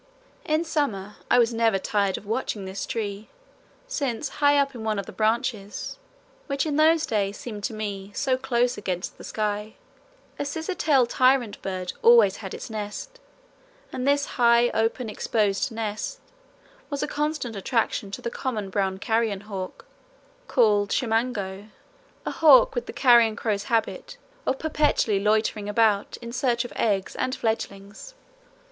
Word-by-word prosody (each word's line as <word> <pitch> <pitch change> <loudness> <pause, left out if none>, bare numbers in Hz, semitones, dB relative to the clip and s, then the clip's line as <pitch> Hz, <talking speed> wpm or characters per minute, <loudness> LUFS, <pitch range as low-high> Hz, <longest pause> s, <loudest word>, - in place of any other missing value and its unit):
In 310 +2 +1
summer 225 - -2
I - - +5
was 235 -1 +4
never 225 -3 +2
tired 200 0 0
of - - -11
watching 215 -2 -2
this 190 +1 -5
tree, 210 -2 -4 0.6
since 280 - -2
high 290 0 +3
up 275 -1 +2
in 235 -3 -7
one 215 -1 0
of 200 - -3
the - - -9
branches, 220 - -2 0.5
which 280 0 -1
in 300 -2 -1
those 315 +1 +4
days 200 -2 -1
seemed 210 -4 -7
to - - -3
me 200 -2 -5
"so 265 -1 +1
close 245 -2 0
against 185 -3 -4
the - - -10
sky," 210 0 -3 0.6
a - - -1
scissor 320 +5 -3
tail 290 -7 +3
tyrant 255 -2 +2
bird 185 -1 -4
always 230 -4 +6
had 195 -3 -7
its - - -7
nest, 220 - -6 0.7
and 255 +1 -3
this 285 0 +3
high 235 -1 +4
open 225 +2 0
exposed 215 +3 0
nest 220 - -4 0.7
was 285 -2 -2
a - - -1
constant 295 -6 -2
attraction 220 -1 -1
to 195 - -7
the 235 - -3
common 215 -8 -3
brown 190 -1 0
carrion 220 -1 0
hawk, 195 -3 -7 0.6
called 210 - +3
chimango 220 -5 -1 0.6
a - - -2
hawk 295 -5 +6
with 245 -1 -3
the - - -5
carrion 235 -4 +5
crow's 205 -2 -2
habit 235 - -1 0.3
of 265 - +1
perpetually 295 -9 +1
loitering 210 0 +1
about 210 -1 +2
in 235 - -6
search 245 -2 +1
of - - -8
eggs 200 -4 0
and 255 +1 -1
fledglings. 210 - -4
225 Hz, 155 wpm, -25 LUFS, 205-260 Hz, 0.7 s, always